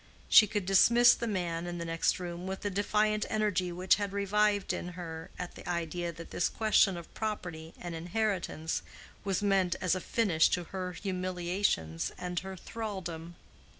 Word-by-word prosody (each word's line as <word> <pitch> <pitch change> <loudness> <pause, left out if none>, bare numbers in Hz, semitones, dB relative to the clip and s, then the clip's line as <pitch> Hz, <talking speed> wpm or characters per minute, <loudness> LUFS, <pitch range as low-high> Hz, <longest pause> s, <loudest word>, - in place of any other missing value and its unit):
She 215 - +9
could 205 -2 -2
dismiss 235 +5 +6
the 235 - -3
man 175 -4 -2
in 175 0 -4
the 170 - -4
next 165 +2 +1
room 175 0 -5
with 190 0 -4
the 205 - -2
defiant 210 +2 +1
energy 205 -5 0
which 180 +3 +3
had 200 -2 -3
revived 205 0 +1
in 180 0 -5
her 165 -2 -6
at 180 - -5
the - - -9
idea 170 0 -2
that 165 0 -11
this 175 - +1
question 215 -4 +3
of 170 - -10
property 180 -7 -4
and 175 -1 -6
inheritance 170 -2 -2 0.4
was 195 0 -1
meant 195 -3 +2
as 185 -2 +1
a 185 - -1
finish 180 -9 +3
to 175 - -4
her 185 +1 -5
humiliations 180 - -1
and 180 -1 -3
her 190 0 -7
thraldom. 175 -5 -6
185 Hz, 170 wpm, -31 LUFS, 170-205 Hz, 0.4 s, She